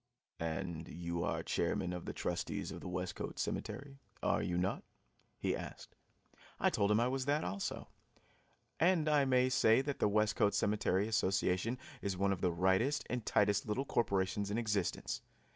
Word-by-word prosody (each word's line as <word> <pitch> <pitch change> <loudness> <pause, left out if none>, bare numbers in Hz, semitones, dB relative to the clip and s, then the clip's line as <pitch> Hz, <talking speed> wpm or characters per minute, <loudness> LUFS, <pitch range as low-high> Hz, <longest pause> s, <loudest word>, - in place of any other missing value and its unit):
"And 80 0 -3
you 85 +1 -3
are - - -1
chairman 90 -1 0
of 90 - -5
the - - -3
trustees - - -3
of - - -7
the - - -6
Westcote 90 0 -4
Cemetery, 140 +1 -4 0.2
are - - +2
you 90 - -1
not?" 95 +3 0 0.5
he - - 0
asked. - - -8 0.6
I - - +3
told 100 - +2
him 105 +1 +4
I 120 - +3
was 130 0 -1
that 145 +2 +1
also. 95 +2 -3 0.9
And 170 -2 +3
I 150 -2 +4
may 130 -1 +4
say 115 -2 +5
that 145 0 -3
the - - +3
Westcote 105 0 +2
Cemetery 100 -1 +1
Association 95 +1 +1 0.2
is 100 -2 -2
one 100 +1 +2
of 95 - -6
the 90 - +2
rightest 95 - +2
and 125 -2 -1
tightest 105 0 +2
little 125 +6 -1
corporations 100 -4 0
in 105 - -1
existence. 105 -6 -1
105 Hz, 165 wpm, -35 LUFS, 90-125 Hz, 0.9 s, say